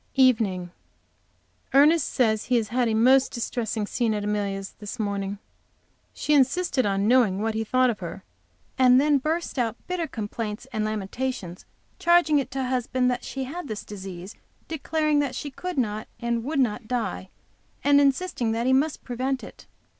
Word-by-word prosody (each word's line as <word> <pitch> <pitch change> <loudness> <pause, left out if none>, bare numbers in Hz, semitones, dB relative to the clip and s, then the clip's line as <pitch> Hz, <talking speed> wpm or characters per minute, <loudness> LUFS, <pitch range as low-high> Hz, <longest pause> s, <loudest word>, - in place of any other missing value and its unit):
EVENING. 220 -9 +3 1.0
Ernest 300 +3 +5
says 220 -4 +1
he 255 - +1
had 235 +3 0
a 220 - +1
most 260 +4 +5
distressing 225 -2 -2
scene 225 0 0
at 205 - -3
Amelia's 200 -2 -2
this 210 +3 -7
morning. 200 -2 -2 0.7
She 300 - -1
insisted 275 -2 +2
on 195 +1 +1
knowing 230 -6 +4
what 220 +1 -1
he 220 0 -1
thought 255 +2 +3
of 215 - -7
her, 180 +1 -7 0.6
and 255 0 +6
then 290 0 +3
burst 315 0 -2
out 230 -2 0
bitter 360 -3 -2
complaints 215 0 -5
and 215 -1 0
lamentations, 215 -2 -4 0.3
charging 340 -4 +4
it 275 - -3
to 265 0 -3
husband 250 0 0
that 250 - -3
she 270 - -4
had 295 +5 -6
this 215 -3 -5
disease, 190 -1 -8 0.3
declaring 310 -1 0
that 275 -3 -1
she 290 +2 -5
could 360 +5 -6
not, 215 -4 -1
and 235 -1 -1
would 290 0 -1
not 230 -3 0
die, 235 -6 -3 0.5
and 285 0 +5
insisting 275 -4 +1
that 230 +1 -1
he 260 - +3
must 285 +3 +1
prevent 260 +2 -2
it. - - -12
245 Hz, 165 wpm, -25 LUFS, 215-275 Hz, 1.0 s, and